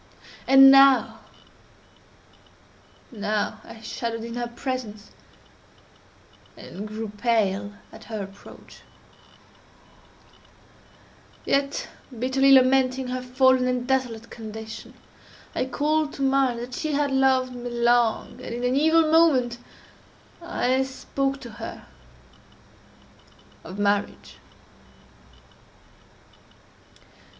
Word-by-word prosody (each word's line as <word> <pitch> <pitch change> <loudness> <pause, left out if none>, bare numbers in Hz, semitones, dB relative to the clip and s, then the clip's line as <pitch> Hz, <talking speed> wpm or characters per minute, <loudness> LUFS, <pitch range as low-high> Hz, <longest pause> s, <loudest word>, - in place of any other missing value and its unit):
And 270 0 +8
now—now 220 -5 -2
I 220 - -13
shuddered 230 0 -5
in 230 0 -7
her 240 0 -3
presence, 235 -4 -6 1.5
and 205 +3 -8
grew 215 +1 -6
pale 205 -2 -1 0.2
at 220 - -14
her 215 -3 -5
approach; 195 +1 -14 2.7
yet, 275 0 -1 0.3
bitterly 265 +3 +2
lamenting 260 -1 +4
her 255 0 -3
fallen 255 0 +2
and 250 -1 -1
desolate 250 -4 -2
condition, 220 -1 -9 0.6
I - - -1
called 300 +3 -1
to 275 - -4
mind 270 -2 +2
that 245 +1 -8
she 310 +3 -3
had 285 0 0
loved 265 -1 +2
me 245 0 -6
long, 240 -1 +1
and, 235 - -6
in 240 - -5
an 250 +1 +1
evil 320 +2 +3
moment, 260 -8 +3 0.8
I 265 -6 0
spoke 270 +1 -3
to 235 - -9
her - - -8 1.8
of 185 +4 -9
marriage. 205 0 -2
250 Hz, 90 wpm, -24 LUFS, 225-270 Hz, 2.7 s, And